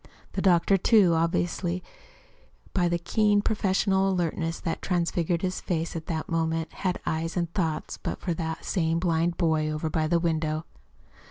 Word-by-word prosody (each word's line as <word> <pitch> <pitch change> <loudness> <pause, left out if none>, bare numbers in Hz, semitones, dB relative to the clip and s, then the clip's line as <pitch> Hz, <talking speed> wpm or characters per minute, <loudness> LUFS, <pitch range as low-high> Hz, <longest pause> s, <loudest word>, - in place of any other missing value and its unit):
The - - -1
doctor, 185 +1 +4
too, 195 -3 +5
obviously, 175 +2 0 0.9
by 175 -2 +2
the 175 - +1
keen, 205 +4 +2
professional 195 -2 +2
alertness 165 -2 -1
that 165 - -3
transfigured 175 -1 0
his 185 0 -1
face 165 -1 -2
at 160 -1 -5
that 160 -3 -3
moment, 165 0 -1
had 185 -2 -2
eyes 165 +2 -2
and 170 -1 -1
thoughts 165 -6 -2
but - - -3
for 175 - -2
that 160 -1 -4
same 165 -3 +1
blind 170 0 +1
boy 160 -3 +1
over 155 +1 -2
by 155 -1 +1
the 170 +1 +2
window. 160 -2 -1
170 Hz, 160 wpm, -27 LUFS, 160-185 Hz, 0.9 s, too